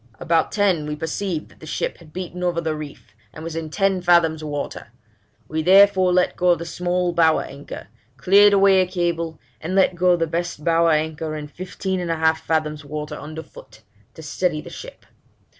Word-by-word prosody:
About 165 Hz, 0 st, +1 dB
ten 190 Hz, -7 st, +1 dB
we 150 Hz, -, -3 dB
perceived 160 Hz, +2 st, -4 dB
that -, -, -22 dB
the 155 Hz, -, -11 dB
ship -, -, -3 dB
had 165 Hz, -3 st, -16 dB
beaten 180 Hz, +1 st, -6 dB
over 175 Hz, -1 st, 0 dB
the 160 Hz, -1 st, -2 dB
reef, 150 Hz, -7 st, -10 dB, 0.2 s
and 155 Hz, -, -10 dB
was 165 Hz, -1 st, -6 dB
in 165 Hz, -1 st, -4 dB
ten 195 Hz, +2 st, 0 dB
fathoms 170 Hz, -3 st, +3 dB
water; 145 Hz, -2 st, -5 dB, 0.6 s
we 160 Hz, +1 st, -2 dB
therefore 190 Hz, +1 st, +5 dB
let 180 Hz, 0 st, +2 dB
go 180 Hz, -1 st, +3 dB
the 170 Hz, -, -7 dB
small 180 Hz, +1 st, -1 dB
bower 160 Hz, -2 st, +3 dB
anchor, 140 Hz, +1 st, -9 dB, 0.3 s
cleared 200 Hz, +8 st, +6 dB
away 195 Hz, -1 st, +5 dB
a 185 Hz, -, 0 dB
cable, 170 Hz, -3 st, -2 dB, 0.2 s
and 175 Hz, +4 st, -3 dB
let 190 Hz, -1 st, +4 dB
go 180 Hz, +1 st, +3 dB
the 165 Hz, -1 st, 0 dB
best 165 Hz, -1 st, -4 dB
bower 165 Hz, 0 st, +3 dB
anchor 155 Hz, 0 st, -1 dB
in 150 Hz, -1 st, -6 dB
fifteen 185 Hz, +4 st, -4 dB
and 175 Hz, -1 st, -4 dB
a 165 Hz, -, +1 dB
half 160 Hz, 0 st, +1 dB
fathoms 155 Hz, -1 st, -1 dB
water 150 Hz, +1 st, -6 dB
under 155 Hz, +2 st, -8 dB
foot, 110 Hz, -6 st, -16 dB, 0.3 s
to 160 Hz, -, -11 dB
steady 155 Hz, +2 st, -1 dB
the -, -, -10 dB
ship. -, -, -11 dB
165 Hz, 190 wpm, -22 LUFS, 155-180 Hz, 0.6 s, cleared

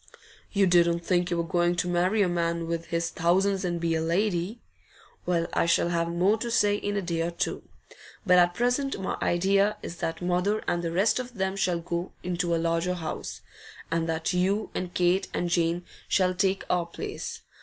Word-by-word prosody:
'You 200 Hz, -1 st, +3 dB
didn't 170 Hz, -1 st, +4 dB
think 175 Hz, -1 st, +1 dB
you 175 Hz, -, 0 dB
were 170 Hz, -, +1 dB
going 175 Hz, +1 st, +1 dB
to 180 Hz, -, -1 dB
marry 180 Hz, +4 st, +2 dB
a -, -, +2 dB
man 170 Hz, -1 st, -1 dB
with 165 Hz, 0 st, -3 dB
his 170 Hz, 0 st, -2 dB
thousands 190 Hz, +4 st, +2 dB
and 175 Hz, -2 st, -1 dB
be 165 Hz, 0 st, 0 dB
a 160 Hz, -, 0 dB
lady? 180 Hz, +4 st, 0 dB, 0.7 s
Well, 170 Hz, -2 st, +1 dB
I -, -, +2 dB
shall 170 Hz, 0 st, +3 dB
have 170 Hz, -1 st, 0 dB
more 185 Hz, +6 st, +2 dB
to 235 Hz, -, -3 dB
say 205 Hz, -3 st, +3 dB
in 205 Hz, 0 st, -2 dB
a 200 Hz, -, -1 dB
day 170 Hz, -2 st, -1 dB
or 165 Hz, -, 0 dB
two. 170 Hz, -, -3 dB, 0.6 s
But 180 Hz, -2 st, +6 dB
at 175 Hz, 0 st, +3 dB
present 245 Hz, +4 st, 0 dB
my 190 Hz, -, -2 dB
idea 195 Hz, +4 st, +2 dB
is 170 Hz, -, -6 dB
that 165 Hz, -, -3 dB
mother 180 Hz, +4 st, 0 dB
and 175 Hz, -, 0 dB
the 165 Hz, -, -2 dB
rest 195 Hz, +8 st, +2 dB
of 250 Hz, -1 st, -6 dB
them 190 Hz, -1 st, -1 dB
shall 180 Hz, -3 st, +1 dB
go 170 Hz, +1 st, -4 dB
into 175 Hz, -1 st, 0 dB
a -, -, +1 dB
larger 165 Hz, +2 st, 0 dB
house, 160 Hz, -3 st, -5 dB, 0.5 s
and 165 Hz, 0 st, 0 dB
that 160 Hz, +2 st, -1 dB
you 195 Hz, +4 st, 0 dB
and 180 Hz, -1 st, -3 dB
Kate 180 Hz, +2 st, +2 dB
and 175 Hz, -1 st, -1 dB
Jane 170 Hz, 0 st, +1 dB, 0.2 s
shall 185 Hz, -1 st, +3 dB
take 190 Hz, +1 st, +1 dB
our 175 Hz, -1 st, 0 dB
place. 170 Hz, -, -6 dB
175 Hz, 200 wpm, -27 LUFS, 170-195 Hz, 0.7 s, But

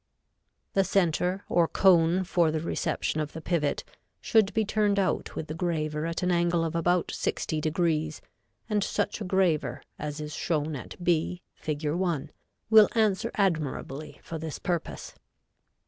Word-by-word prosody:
The 195 Hz, -, +4 dB
center, 185 Hz, 0 st, +1 dB
or 170 Hz, -1 st, +3 dB
cone 180 Hz, 0 st, +4 dB
for 175 Hz, -2 st, +2 dB
the 155 Hz, 0 st, -1 dB
reception 155 Hz, -1 st, -1 dB
of 150 Hz, 0 st, -4 dB
the 160 Hz, -, -6 dB
pivot, 160 Hz, -3 st, 0 dB, 0.4 s
should 220 Hz, -3 st, +3 dB
be 220 Hz, -1 st, +1 dB
turned 205 Hz, -1 st, +1 dB
out 190 Hz, -4 st, 0 dB
with 160 Hz, -, -3 dB
the 155 Hz, -, -5 dB
graver 155 Hz, -2 st, -1 dB
at 165 Hz, +2 st, -3 dB
an 180 Hz, -, +2 dB
angle 170 Hz, -1 st, +2 dB
of 160 Hz, -, -3 dB
about 175 Hz, +1 st, +1 dB
60° 155 Hz, 0 st, -1 dB, 0.5 s
and 210 Hz, -3 st, +1 dB
such 210 Hz, +1 st, -1 dB
a -, -, -2 dB
graver 165 Hz, -9 st, +1 dB, 0.2 s
as 150 Hz, 0 st, -4 dB
is 150 Hz, 0 st, -5 dB
shown 155 Hz, -2 st, -1 dB
at 130 Hz, -, -8 dB
B, 175 Hz, +1 st, +1 dB
Fig. 150 Hz, 0 st, -4 dB
1, 160 Hz, -4 st, -1 dB, 0.4 s
will 220 Hz, -1 st, +8 dB
answer 220 Hz, 0 st, +2 dB
admirably 155 Hz, -6 st, -1 dB
for 165 Hz, -, -6 dB
this 160 Hz, -1 st, -5 dB
purpose. 175 Hz, -2 st, -3 dB
170 Hz, 150 wpm, -28 LUFS, 155-185 Hz, 0.5 s, will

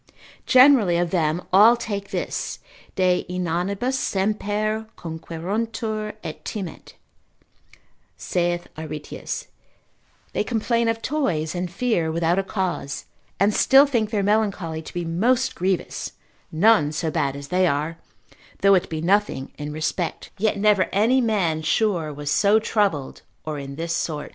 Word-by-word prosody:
Generally 255 Hz, -9 st, +6 dB
of 175 Hz, -1 st, 0 dB
them 165 Hz, -1 st, 0 dB
all 220 Hz, +5 st, +7 dB
take 200 Hz, -4 st, -4 dB
this, -, -, -3 dB, 0.4 s
de 185 Hz, -1 st, +2 dB
inanibus 185 Hz, +8 st, -1 dB
semper 215 Hz, +2 st, -1 dB
conqueruntur 215 Hz, +7 st, -4 dB
et 155 Hz, -, -7 dB
timent, 190 Hz, -8 st, -7 dB, 1.2 s
saith 175 Hz, 0 st, -1 dB
Aretius; 155 Hz, -1 st, -6 dB, 0.9 s
they -, -, 0 dB
complain 235 Hz, 0 st, 0 dB
of 225 Hz, 0 st, -1 dB
toys, 180 Hz, -, -1 dB
and 180 Hz, 0 st, -3 dB
fear 175 Hz, -5 st, 0 dB
without 170 Hz, +3 st, +1 dB
a -, -, 0 dB
cause, 185 Hz, -8 st, -3 dB, 0.3 s
and 200 Hz, +2 st, +3 dB
still 270 Hz, +6 st, +6 dB
think 235 Hz, -7 st, 0 dB
their 210 Hz, -3 st, 0 dB
melancholy 200 Hz, -6 st, 0 dB
to 155 Hz, -, -10 dB
be 175 Hz, -1 st, -2 dB
most 235 Hz, +10 st, +1 dB
grievous, 185 Hz, 0 st, -2 dB, 0.4 s
none 160 Hz, -3 st, +4 dB
so 155 Hz, +1 st, -2 dB
bad 140 Hz, -4 st, 0 dB
as 140 Hz, 0 st, -8 dB
they 185 Hz, 0 st, +3 dB
are, 155 Hz, +2 st, -1 dB, 0.6 s
though 195 Hz, 0 st, +7 dB
it 185 Hz, -, +2 dB
be 160 Hz, -1 st, -3 dB
nothing 185 Hz, -6 st, +1 dB
in 150 Hz, 0 st, -4 dB
respect, 155 Hz, +3 st, -3 dB
yet 210 Hz, 0 st, +1 dB
never 200 Hz, -2 st, +3 dB
any 230 Hz, +6 st, +3 dB
man 190 Hz, -9 st, +1 dB
sure 170 Hz, -2 st, +1 dB
was 145 Hz, 0 st, -4 dB
so 205 Hz, +5 st, +4 dB
troubled, 200 Hz, -11 st, 0 dB, 0.2 s
or 155 Hz, -2 st, -4 dB
in 140 Hz, 0 st, -7 dB
this 165 Hz, +2 st, -2 dB
sort. 150 Hz, -3 st, -3 dB
185 Hz, 140 wpm, -23 LUFS, 160-215 Hz, 1.2 s, all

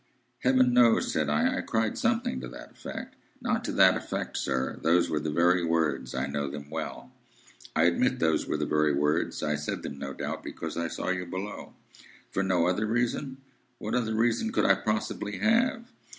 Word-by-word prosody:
"Heaven 130 Hz, -1 st, +4 dB
knows," 120 Hz, -2 st, +4 dB
said 75 Hz, -2 st, 0 dB
I. 75 Hz, +1 st, +2 dB
"I -, -, 0 dB
cried 110 Hz, -1 st, 0 dB
something 65 Hz, -, 0 dB
to 65 Hz, -, -6 dB
that -, -, -11 dB
effect—" -, -, -8 dB, 0.2 s
"Not -, -, -1 dB
to -, -, -2 dB
that -, -, +6 dB
effect, -, -, -4 dB
sir. 65 Hz, -1 st, -1 dB
Those 85 Hz, +1 st, +3 dB
were 75 Hz, -, +1 dB
the 75 Hz, -, -3 dB
very 85 Hz, +3 st, +3 dB
words. 75 Hz, -7 st, 0 dB
I 65 Hz, 0 st, 0 dB
know 70 Hz, 0 st, -2 dB
them 70 Hz, +1 st, -8 dB
well." 65 Hz, 0 st, -5 dB, 0.6 s
"Admit 85 Hz, +11 st, +3 dB
those 80 Hz, -8 st, +1 dB
were -, -, 0 dB
the -, -, -1 dB
very 75 Hz, -1 st, +2 dB
words. 75 Hz, +3 st, 0 dB
I 75 Hz, -, +1 dB
said 75 Hz, 0 st, -3 dB
them, 70 Hz, -, -6 dB
no 70 Hz, -, -4 dB
doubt, -, -, -4 dB
because 80 Hz, -, -6 dB
I 85 Hz, 0 st, -1 dB
saw 80 Hz, -, -4 dB
you 90 Hz, -1 st, -1 dB
below." 95 Hz, +4 st, -6 dB, 0.6 s
"For 95 Hz, -, 0 dB
no 95 Hz, -3 st, +2 dB
other 95 Hz, +5 st, +1 dB
reason?" 120 Hz, +4 st, -1 dB, 0.4 s
"What 110 Hz, -, -5 dB
other 115 Hz, -3 st, 0 dB
reason 120 Hz, -, +1 dB
could -, -, +1 dB
I 95 Hz, -, +7 dB
possibly 105 Hz, +1 st, -2 dB
have?" 235 Hz, +2 st, +1 dB
85 Hz, 190 wpm, -28 LUFS, 75-110 Hz, 0.6 s, I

